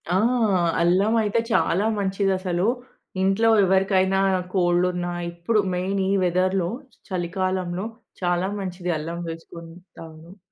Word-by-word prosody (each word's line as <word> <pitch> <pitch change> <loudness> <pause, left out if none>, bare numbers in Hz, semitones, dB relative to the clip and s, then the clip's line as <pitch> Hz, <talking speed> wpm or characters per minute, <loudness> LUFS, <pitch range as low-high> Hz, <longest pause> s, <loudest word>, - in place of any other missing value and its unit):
ఆ! - - +4 0.6
అల్లం 185 +6 +3
అయితే 210 +1 +1
చాలా 200 -3 +2
మంచిది 195 0 0
అసలు. 180 -1 -1 0.6
ఇంట్లో 195 +4 +3 0.2
ఎవరికైనా 190 0 +2 0.3
కోల్డ్ 175 -1 +2
ఉన్నా 175 0 -3 0.2
ఇప్పుడు 175 +6 0
మెయిన్ 190 +2 -1
ఈ - - +1
వెదర్‌లో 185 0 +1 0.4
చలికాలంలో 185 0 -2 0.4
చాలా 175 +1 +1
మంచిది 180 -2 -4
అల్లం 165 +3 -5
వేసుకుని 165 0 -9 0.2
తాగడం. 165 +4 -12
185 Hz, 115 wpm, -23 LUFS, 175-195 Hz, 0.6 s, ఆ